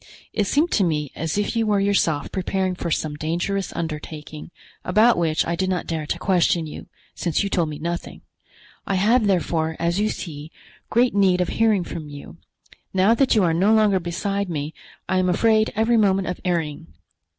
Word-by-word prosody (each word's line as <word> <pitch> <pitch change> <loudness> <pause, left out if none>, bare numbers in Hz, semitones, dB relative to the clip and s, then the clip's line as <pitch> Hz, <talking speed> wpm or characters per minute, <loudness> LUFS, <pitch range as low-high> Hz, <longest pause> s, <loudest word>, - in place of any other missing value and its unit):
It 205 -2 0
seemed 310 - +2
to 200 - +3
me 150 -5 -1
as 160 +3 -3
if 205 +2 -1
you 225 -1 +1
were 205 -1 +2
yourself 195 -7 +1
preparing 190 0 -1
for 175 -1 -4
some 155 -1 -1
dangerous 170 +6 -2
undertaking, 155 -1 -6 0.3
about 215 +6 +4
which 160 -2 +1
I 170 - -1
did 185 +2 -1
not 185 -1 -1
dare 160 -3 -3
to - - -2
question 175 -3 +2
you, 150 - -9 0.3
since 170 +2 -1
you 200 - -2
told 170 -4 +1
me 150 - -6
nothing. 170 +2 -5 0.7
I 195 - 0
have, 215 +4 +3
therefore, 160 -3 0
as 170 +3 0
you 215 +1 +1
see, 155 -5 -7 0.4
great 240 +2 +3
need 190 -3 +3
of 180 - 0
hearing 220 -4 +2
from 155 -3 -7
you. 145 -1 -10 0.6
Now 190 +4 +4
that 260 +1 +2
you 210 - +4
are 165 -2 +2
no 195 +6 +3
longer 210 -3 +3
beside 195 +3 -2
me 150 -1 -4 0.3
I 185 - +1
am 185 0 +1
afraid 220 +4 +3
every 225 +2 +2
moment 195 -3 +2
of 180 - -5
erring. 165 - -2
180 Hz, 190 wpm, -22 LUFS, 160-205 Hz, 0.7 s, about